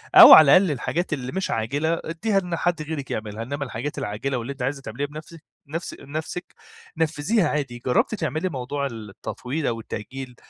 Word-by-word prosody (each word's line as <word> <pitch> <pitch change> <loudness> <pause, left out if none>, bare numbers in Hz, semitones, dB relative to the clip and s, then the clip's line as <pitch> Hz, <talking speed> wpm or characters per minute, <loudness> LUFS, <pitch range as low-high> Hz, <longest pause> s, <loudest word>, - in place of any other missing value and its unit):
أو - - +12
على 155 +1 +9
الأقل 185 -3 +2
الحاجات 160 +5 -2
اللي 130 -3 -4
مش 190 +1 -2
عاجلة 145 +9 -1
ادّيها 195 +5 0
إن 180 -2 -3
حد 175 -1 0
غيرِك 150 -3 -5
يعملها، 110 0 -4
إنما 140 +4 -4
الحاجات 130 +4 -5
العاجلة 130 +1 -2
واللي 120 +3 -4
أنتِ 135 - -12
عايزة 135 +2 -2
تعمليها 135 +3 -4
بنفسِك 155 +2 -11 0.2
نفس 165 +4 -5
نفسِك 155 +5 -6 0.4
نفّذيها 160 +5 +1
عادي. 135 -5 -3
جرّبتِ 125 - +2
تعملي 160 0 -2
موضوع 140 0 -3
التطويل 120 +6 -5
أو 115 -1 -1
التأجيل 125 +4 -7
145 Hz, 170 wpm, -24 LUFS, 125-160 Hz, 0.4 s, أو